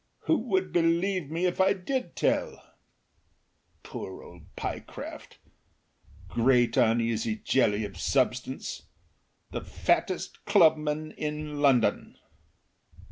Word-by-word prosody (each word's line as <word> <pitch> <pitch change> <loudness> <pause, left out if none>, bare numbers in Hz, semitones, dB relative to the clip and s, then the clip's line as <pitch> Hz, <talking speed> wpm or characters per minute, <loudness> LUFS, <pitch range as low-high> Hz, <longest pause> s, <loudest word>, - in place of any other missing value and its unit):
Who 320 - +2
would 190 -3 0
believe 170 0 +1
me 165 +3 -1
if 180 +1 +1
I 190 +1 +5
did 195 0 -3
tell? - - -1 1.1
Poor 95 - -7
old 85 -3 -15
Pyecraft! - - -7 0.9
Great, 120 +5 +3
uneasy 115 -2 +2
jelly 110 -2 +1
of 95 -3 -9
substance! 130 +1 -1 0.6
The - - -4
fattest - - -1
clubman 155 -1 +3
in 150 -1 -4
London. 130 -5 +2
145 Hz, 95 wpm, -28 LUFS, 115-170 Hz, 1.1 s, I